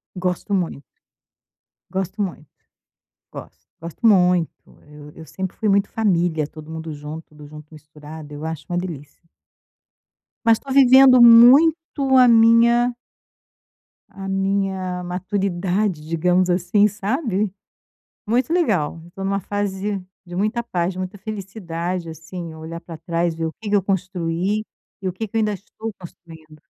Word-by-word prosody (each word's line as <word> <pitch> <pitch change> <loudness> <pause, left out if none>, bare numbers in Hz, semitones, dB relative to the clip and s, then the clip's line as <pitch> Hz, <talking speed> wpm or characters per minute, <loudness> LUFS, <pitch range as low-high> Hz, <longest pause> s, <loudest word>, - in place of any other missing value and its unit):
Gosto 180 +2 -3
mui 175 -7 -1 1.1
Gosto 190 +2 -3
muito! 170 -6 -4 0.9
Go - - -8 0.3
gosto 170 +8 -3
muito, 180 -5 +4 0.3
eu 150 0 -13
eu 160 - -12
sempre 190 +2 -6
fui 215 - -1
muito 200 0 +2
família, 175 -7 0
todo 155 +1 -12
mundo 160 0 -6
junto, 150 +2 -8
tudo 150 -1 -14
junto 150 +1 -13
misturado. 150 0 -12
Eu 145 +1 -7
acho 160 -2 -5
uma 175 - -1
delícia. 160 -6 -7 1.2
Mas 225 -1 +4
tô 275 - -9
vivendo 260 -1 +7
muito 270 +4 +6
a 250 -1 +7
minha 235 +1 +5 1.2
a 195 -1 -9
minha 195 -2 -1
maturidade, 185 0 -2
digamos 180 +3 +1
assim, 180 +4 +3
sabe? 210 - -2 0.8
Muito 245 +7 0
legal, 195 - 0
eu 170 - -16
tô 195 - -7
numa 195 +1 -1
fase 200 0 -3 0.2
de 175 0 -8
muita 215 +5 0
paz, 180 -5 -2
muita 185 +2 -5
felicidade 185 -4 -5
assim, 165 +1 -8
olhar 160 +1 -8
para 170 -1 -10
trás 170 +1 -1
e - - -14
ver 165 - -1
o 160 - -4
que 220 - -6
que 205 - +4
eu 200 - +2
construí, 185 +1 -2 0.4
e 190 - -3
o - - -3
que 220 +5 -5
que 210 - -7
eu - - +3
ainda 215 -1 +1
estou 215 +3 -8
construindo. 160 -3 -14
185 Hz, 145 wpm, -21 LUFS, 165-210 Hz, 1.2 s, vivendo